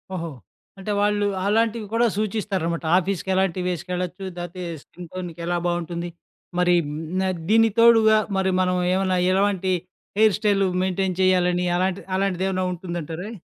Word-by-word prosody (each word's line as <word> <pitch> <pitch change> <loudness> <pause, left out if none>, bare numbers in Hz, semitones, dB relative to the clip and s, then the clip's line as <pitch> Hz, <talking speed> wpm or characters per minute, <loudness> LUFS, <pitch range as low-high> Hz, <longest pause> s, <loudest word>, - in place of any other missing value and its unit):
ఓహో! 170 -2 -4 0.5
అంటే, 195 +2 -4
వాళ్ళు 205 0 +2 0.2
అలాంటివి 225 +1 +1
కూడా 235 +1 +3
సూచిస్తారనమాట. 195 -6 -2
ఆఫీస్‌కెలాంటివి 190 -1 0
వేసుకెళ్లొచ్చు. 180 +2 -4
లేతే 175 +1 -6 0.2
స్కిన్ 175 -2 -12
టోన్‌కి 180 -3 -6
ఎలా 175 0 0
బాగుంటుంది, 175 0 -3 0.5
మరి 180 0 +4
హ్మ్, 145 - -5 0.2
న్ - - +1 0.3
దీనికి 225 -1 +4
తోడుగా, 225 -2 +6 0.2
మరి 190 0 +1
మనం 180 0 +1 0.2
ఏమన్నా 185 -1 +1 0.2
ఎలాంటి 190 -1 +1 0.5
హెయిర్ 220 -2 +5
స్టైల్ 205 -2 +2 0.2
మెయింటైన్ 190 0 -1
చేయాలని 180 -1 +3
అలాంటి 185 +1 0
అలాంటిది 190 -1 0
ఏమైనా 185 -1 -1
ఉంటుందంటారా? 175 +1 -5
185 Hz, 135 wpm, -23 LUFS, 175-205 Hz, 0.5 s, తోడుగా